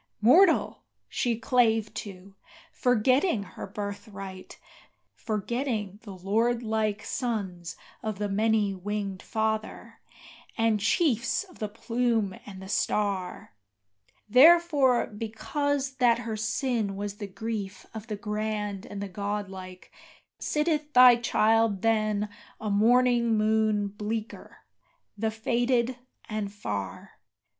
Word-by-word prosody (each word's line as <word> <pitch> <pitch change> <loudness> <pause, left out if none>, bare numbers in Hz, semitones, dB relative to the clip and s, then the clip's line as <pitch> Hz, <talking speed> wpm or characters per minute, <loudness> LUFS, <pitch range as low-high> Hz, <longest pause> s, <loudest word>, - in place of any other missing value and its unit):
Mortal 325 - +5 0.3
she 235 -2 0
clave 225 -3 +2
to, 195 -2 -8 0.4
forgetting 250 - +2
her 185 - -9
birthright, 200 -1 -7 0.5
forgetting 215 -2 -3
the 200 -4 -10
lordlike 220 +1 0
Sons 195 -10 -3 0.3
of 215 -2 -3
the 205 +1 -1
many 210 0 +1
winged 195 0 -4
Father, 220 -1 -3 0.6
and 225 -2 +2
chiefs 250 - +1
of 370 -3 -18
the 215 - -3
plume 230 -2 0
and 195 -2 -9
the 190 - -9
star, 195 - -1 0.7
Therefore, 280 0 +6
because 265 +6 -3
that 240 -2 +4
her 230 -2 -4
sin 220 -1 -1
was 205 0 -5
the 205 - -5
grief 200 -1 -5
of 220 0 -8
the 210 -3 -4
grand 210 0 -3
and 200 0 -6
the - - -4
godlike, 190 -2 -6 0.5
Sitteth 300 -1 -1
thy 250 -1 +9
child 225 -3 +2
than 215 -2 +1 0.3
a 215 -1 -3
morning 235 +2 +4
moon 215 -1 +2
bleaker, 215 +2 -6 0.5
the 220 +2 -1
faded, 240 +2 0 0.3
and 215 -2 -3
far. 100 - -6
215 Hz, 110 wpm, -27 LUFS, 205-240 Hz, 0.7 s, thy